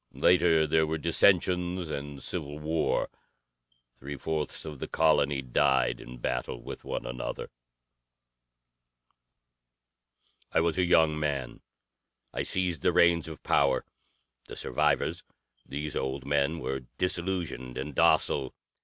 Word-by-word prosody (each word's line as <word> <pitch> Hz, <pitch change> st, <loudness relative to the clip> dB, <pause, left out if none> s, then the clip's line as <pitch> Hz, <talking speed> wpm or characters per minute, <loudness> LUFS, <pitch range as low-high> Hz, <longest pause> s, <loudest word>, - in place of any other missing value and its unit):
Later 85 Hz, -3 st, +4 dB
there 80 Hz, +1 st, +2 dB
were 80 Hz, +1 st, -1 dB
dissensions 90 Hz, +1 st, +2 dB
and 70 Hz, -1 st, -6 dB
civil 75 Hz, +1 st, -3 dB
war. 80 Hz, +2 st, 0 dB, 0.9 s
Three 70 Hz, +2 st, -7 dB
fourths 80 Hz, +2 st, -3 dB
of 75 Hz, -3 st, -7 dB
the -, -, -4 dB
colony 75 Hz, -3 st, +2 dB
died 65 Hz, -1 st, +2 dB
in 60 Hz, +1 st, -10 dB
battle 60 Hz, +1 st, -3 dB
with -, -, -9 dB
one -, -, -4 dB
another. 60 Hz, +1 st, -5 dB, 3.0 s
"I -, -, +3 dB
was 85 Hz, +2 st, +1 dB
a 90 Hz, -, +3 dB
young 80 Hz, -3 st, +4 dB
man. 70 Hz, -4 st, -3 dB, 0.7 s
I -, -, -2 dB
seized 90 Hz, -5 st, 0 dB
the -, -, +3 dB
reins 85 Hz, -1 st, +4 dB
of 80 Hz, -1 st, -9 dB
power. -, -, +2 dB, 0.6 s
The -, -, -8 dB
survivors -, -, 0 dB, 0.4 s
these 75 Hz, +2 st, -4 dB
old 65 Hz, 0 st, -3 dB
men 70 Hz, +3 st, +1 dB
were 65 Hz, -4 st, -4 dB
disillusioned 85 Hz, -9 st, -2 dB
and 70 Hz, +2 st, -4 dB
docile. 65 Hz, 0 st, +3 dB
75 Hz, 120 wpm, -28 LUFS, 70-85 Hz, 3.0 s, Later